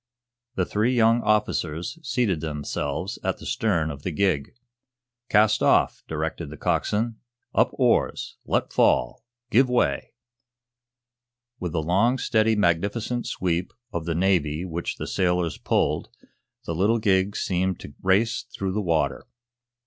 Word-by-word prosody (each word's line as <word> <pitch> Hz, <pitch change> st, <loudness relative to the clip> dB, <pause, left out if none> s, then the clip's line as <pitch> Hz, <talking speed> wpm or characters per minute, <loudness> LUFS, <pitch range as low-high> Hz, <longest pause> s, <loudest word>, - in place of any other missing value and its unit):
The 95 Hz, -, +1 dB
three 110 Hz, +7 st, +1 dB
young 115 Hz, 0 st, +4 dB
officers 105 Hz, -, 0 dB
seated 120 Hz, -, 0 dB
themselves 75 Hz, -2 st, -3 dB
at -, -, -1 dB
the -, -, -11 dB
stern 105 Hz, -10 st, 0 dB
of 70 Hz, -2 st, -9 dB
the 90 Hz, -, -3 dB
gig. 90 Hz, -, 0 dB, 0.7 s
"Cast 105 Hz, 0 st, +4 dB
off," -, -, +3 dB
directed -, -, -3 dB
the 75 Hz, -, -9 dB
coxswain. 110 Hz, +9 st, 0 dB, 0.4 s
"Up -, -, +4 dB
oars! -, -, +1 dB
Let -, -, -1 dB
fall! -, -, +2 dB, 0.3 s
Give 130 Hz, +3 st, +4 dB
way!" 125 Hz, -1 st, 0 dB, 1.5 s
With 90 Hz, -3 st, -4 dB
the 80 Hz, -, 0 dB
long, 100 Hz, +10 st, +2 dB
steady, 110 Hz, -3 st, +2 dB
magnificent 105 Hz, +6 st, 0 dB
sweep 90 Hz, 0 st, -1 dB, 0.2 s
of 85 Hz, -3 st, -3 dB
the 85 Hz, -1 st, -1 dB
Navy 85 Hz, -3 st, +1 dB
which 85 Hz, -1 st, -4 dB
the -, -, -5 dB
sailors 90 Hz, -4 st, 0 dB
pulled, -, -, 0 dB, 0.6 s
the 85 Hz, -, -3 dB
little 100 Hz, +8 st, +2 dB
gig 100 Hz, -2 st, +2 dB
seemed 95 Hz, -1 st, -1 dB
to 70 Hz, -, -10 dB
race 105 Hz, +6 st, +2 dB
through 95 Hz, -1 st, -3 dB
the 105 Hz, +3 st, -1 dB
water. 80 Hz, -7 st, 0 dB
95 Hz, 135 wpm, -25 LUFS, 80-110 Hz, 1.5 s, young